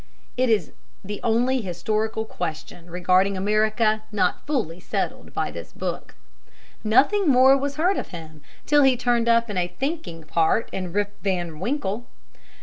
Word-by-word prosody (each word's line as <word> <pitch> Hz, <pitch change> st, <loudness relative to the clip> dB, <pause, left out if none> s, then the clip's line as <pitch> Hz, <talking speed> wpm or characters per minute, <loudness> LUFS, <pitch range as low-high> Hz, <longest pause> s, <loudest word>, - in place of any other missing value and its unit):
It 255 Hz, 0 st, +1 dB
is 220 Hz, -2 st, +1 dB, 0.3 s
the 205 Hz, +1 st, -5 dB
only 245 Hz, +3 st, +2 dB
historical 215 Hz, +4 st, -2 dB
question 170 Hz, -2 st, -6 dB
regarding 185 Hz, +2 st, +2 dB
America 215 Hz, +2 st, +2 dB
not 195 Hz, -4 st, 0 dB
fully 220 Hz, -, -1 dB
settled -, -, -3 dB
by -, -, -2 dB
this -, -, -9 dB
book. -, -, -5 dB, 0.7 s
Nothing 290 Hz, -, +3 dB
more 260 Hz, +1 st, +7 dB
was 280 Hz, +1 st, -2 dB
heard 355 Hz, +6 st, +2 dB
of -, -, -3 dB
him 160 Hz, -3 st, -10 dB, 0.2 s
till 295 Hz, 0 st, +4 dB
he 265 Hz, -2 st, +5 dB
turned 240 Hz, -1 st, +1 dB
up 230 Hz, 0 st, +4 dB
in 205 Hz, -3 st, -4 dB
a 175 Hz, -1 st, +1 dB
thinking 265 Hz, -, -3 dB
part 165 Hz, +7 st, +1 dB
in 185 Hz, -2 st, -4 dB
"Rip 205 Hz, +2 st, -1 dB
Van 175 Hz, -5 st, -2 dB
Winkle." 235 Hz, -, -2 dB
215 Hz, 150 wpm, -24 LUFS, 180-250 Hz, 0.7 s, more